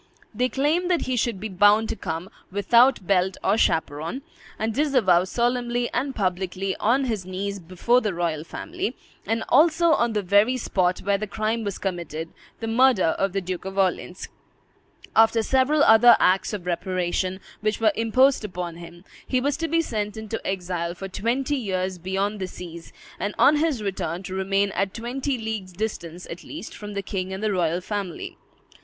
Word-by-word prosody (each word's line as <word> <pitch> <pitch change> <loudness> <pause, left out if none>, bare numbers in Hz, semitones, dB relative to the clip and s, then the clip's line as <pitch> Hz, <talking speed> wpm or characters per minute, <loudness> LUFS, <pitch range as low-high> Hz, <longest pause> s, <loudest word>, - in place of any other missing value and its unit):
They 250 +4 +1
claimed 310 +7 +1
that 350 -2 +2
he 255 - -1
should 230 -4 0
be 220 - -4
bound 205 +3 +4
to - - -2
come, 170 -1 -5 0.2
"without 235 +3 +4
belt 190 0 +1
or 200 - +3
chaperon," 160 - 0 0.3
and 220 +1 -1
disavow 245 - +3
solemnly 240 +2 0
and 265 +2 -1
publicly, 190 0 -1
on 255 +5 +2
his 220 -6 -2
knees 195 +2 -4
before 185 +8 +1
the 210 - -1
royal 165 -3 -1
family, 355 - -5 0.3
and 225 0 0
also 330 +4 +4
on 235 -6 +2
the 210 -1 0
very 205 +7 +3
spot 185 -6 0
where 200 0 +1
the 215 - -3
crime 220 +2 -1
was 200 -2 -3
committed, 170 -4 -4 0.3
the 225 - -3
murder 235 -6 +4
of 195 0 +1
the 195 - 0
Duke 180 -1 -5
of 190 +1 -7
Orleans. 185 -1 -1 0.9
After 225 0 +5
several 270 +5 +3
other 225 +2 +7
acts 185 +1 +3
of 200 -5 -5
reparation 185 +1 -1 0.2
which 215 0 -1
were 220 -2 +3
imposed 255 +4 +3
upon 180 -4 -5
him, 170 +1 -12 0.2
he 255 - +1
was 280 +2 0
to 330 0 -2
be 330 +1 +2
sent 210 -5 -3
into 220 0 -5
exile 175 -2 -3
for 195 +2 -7
twenty 250 +9 -1
years 185 -5 -2
beyond 195 +4 -2
the 185 - -3
seas, 170 -2 -10 0.3
and 205 - -3
on 300 +2 +5
his 295 -8 0
return 190 -3 -3
to 185 - -6
remain 195 +1 +1
at 195 0 -2
twenty 255 +3 -2
leagues' 220 -5 -5
distance, 180 -4 -5
at 170 +1 -8
least, 300 -6 -8
from 210 0 -8
the 200 - -2
king 190 -1 -4
and 190 +2 -5
the 215 - +1
royal 175 -2 0
family. 195 -2 -5
205 Hz, 180 wpm, -24 LUFS, 185-240 Hz, 0.9 s, other